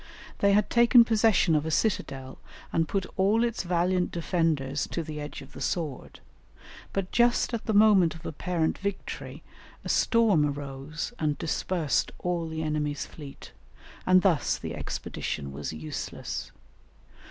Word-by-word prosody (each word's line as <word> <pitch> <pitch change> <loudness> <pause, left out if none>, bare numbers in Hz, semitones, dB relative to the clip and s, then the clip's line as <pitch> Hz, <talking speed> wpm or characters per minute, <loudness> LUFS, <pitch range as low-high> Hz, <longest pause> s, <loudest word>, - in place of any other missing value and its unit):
They 200 0 +4
had 210 0 +2
taken 235 0 +7
possession 220 -6 +3
of 150 - +2
a 160 - -3
citadel 135 -9 -1 0.3
and 165 -1 +2
put 195 +1 -1
all 205 +5 +3
its 235 -1 -1
valiant 180 +1 +1
defenders 160 -5 0
to 170 - -3
the 150 -1 -6
edge 145 -1 -7
of 135 - -15
the - - -10
sword, 155 -7 -3 0.7
but 195 -2 -3
just 240 +1 +3
at 230 - -3
the 220 - +1
moment 200 -6 +5
of 160 - -12
apparent 165 +1 -1
victory 200 0 -5 0.4
a - - -4
storm 225 -9 +3
arose 145 - -4
and 150 -2 0
dispersed 165 -1 0
all 175 -2 -2
the 160 0 -3
enemy's 150 -2 -1
fleet, 145 -3 -11 0.6
and 185 0 +6
thus 175 -6 +2
the - - -6
expedition 70 -1 -4
was 70 +1 -5
useless. 80 0 -5
170 Hz, 145 wpm, -27 LUFS, 150-200 Hz, 0.7 s, taken